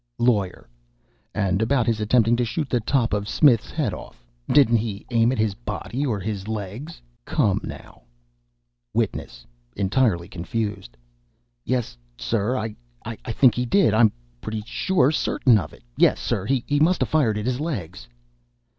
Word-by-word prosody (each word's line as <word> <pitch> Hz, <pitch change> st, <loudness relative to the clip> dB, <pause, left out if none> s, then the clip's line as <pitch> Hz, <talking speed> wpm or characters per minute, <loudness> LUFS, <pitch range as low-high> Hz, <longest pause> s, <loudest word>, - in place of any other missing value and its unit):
LAWYER. 105 Hz, -, 0 dB, 0.7 s
"And 100 Hz, -1 st, +1 dB
about 120 Hz, +1 st, +2 dB
his 115 Hz, -1 st, 0 dB
attempting 115 Hz, +1 st, +3 dB
to 120 Hz, -, +1 dB
shoot 135 Hz, +5 st, -3 dB
the 125 Hz, -, +2 dB
top 115 Hz, 0 st, 0 dB
of 105 Hz, 0 st, -1 dB
Smith's 120 Hz, -5 st, +4 dB
head 140 Hz, -, -1 dB
off -, -, -11 dB, 0.3 s
didn't 125 Hz, -4 st, +5 dB
he 105 Hz, -2 st, -4 dB
aim 115 Hz, 0 st, +3 dB
at 130 Hz, -, -2 dB
his 110 Hz, -2 st, +1 dB
body, 115 Hz, +5 st, -4 dB
or 110 Hz, -5 st, -1 dB
his 100 Hz, 0 st, -4 dB
legs? 110 Hz, -, -6 dB, 0.2 s
Come -, -, +1 dB
now." -, -, -9 dB, 0.9 s
WITNESS. -, -, -2 dB, 0.3 s
(Entirely 95 Hz, -4 st, +1 dB
confused) 95 Hz, -, -4 dB, 0.7 s
"Yes, 120 Hz, -, -2 dB, 0.2 s
sir 115 Hz, +3 st, -1 dB
I 110 Hz, -2 st, -4 dB, 0.6 s
think 125 Hz, +1 st, +5 dB
he 125 Hz, -, -1 dB
did 200 Hz, +10 st, +3 dB
I 110 Hz, -, +2 dB
I'm 110 Hz, -3 st, +6 dB, 0.3 s
pretty 110 Hz, -1 st, -4 dB, 0.5 s
certain 125 Hz, -6 st, +3 dB
of 75 Hz, -5 st, -6 dB
it. -, -, -17 dB
Yes, -, -, +4 dB
sir, 100 Hz, 0 st, -2 dB
he 130 Hz, -2 st, +1 dB, 0.2 s
must 170 Hz, +4 st, +3 dB
a -, -, +1 dB
fired 125 Hz, -9 st, +1 dB
at 105 Hz, -, -3 dB
his 125 Hz, 0 st, -1 dB
legs." 100 Hz, -, -5 dB
110 Hz, 155 wpm, -23 LUFS, 100-125 Hz, 0.9 s, I'm